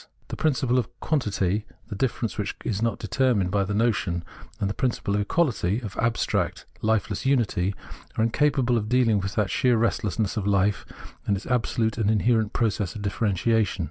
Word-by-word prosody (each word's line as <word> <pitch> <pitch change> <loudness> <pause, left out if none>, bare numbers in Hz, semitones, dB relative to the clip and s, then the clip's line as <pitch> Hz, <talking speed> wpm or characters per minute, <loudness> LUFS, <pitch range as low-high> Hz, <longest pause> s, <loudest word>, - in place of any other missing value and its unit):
The - - -4
prin 155 -2 +2
ciple 125 -1 +1
of 115 - -3
quantity, 105 - 0 0.2
of 100 - -4
difference 120 -3 -1
which 105 -2 -3
is 105 -2 -1
not 115 -2 0
determined 120 -9 +1
by 100 0 +2
the 100 +1 -2
notion, 95 -6 +1 0.4
and 100 - 0
the 100 - -2
principle 120 -5 -1
of 105 - +1
equality, 110 - +1
of 105 -5 -7
abstract, 115 -1 0 0.2
lifeless 110 -2 0
unity, 105 -8 +1 0.4
are 110 - +3
incapable 125 0 +2
of 105 - -4
deahng 115 -3 +3
with 95 +1 -4
that 105 -2 +1
sheer 125 -3 +3
restlessness 110 -2 0
of 100 - -1
hfe 100 -1 +2 0.4
and 100 - +2
its 95 - -9
absolute 115 -2 0
and 105 -2 +2
inherent 110 0 +2
process 105 -5 -1
of 105 - -6
differentiation. 105 +1 +1
110 Hz, 175 wpm, -25 LUFS, 100-120 Hz, 0.4 s, are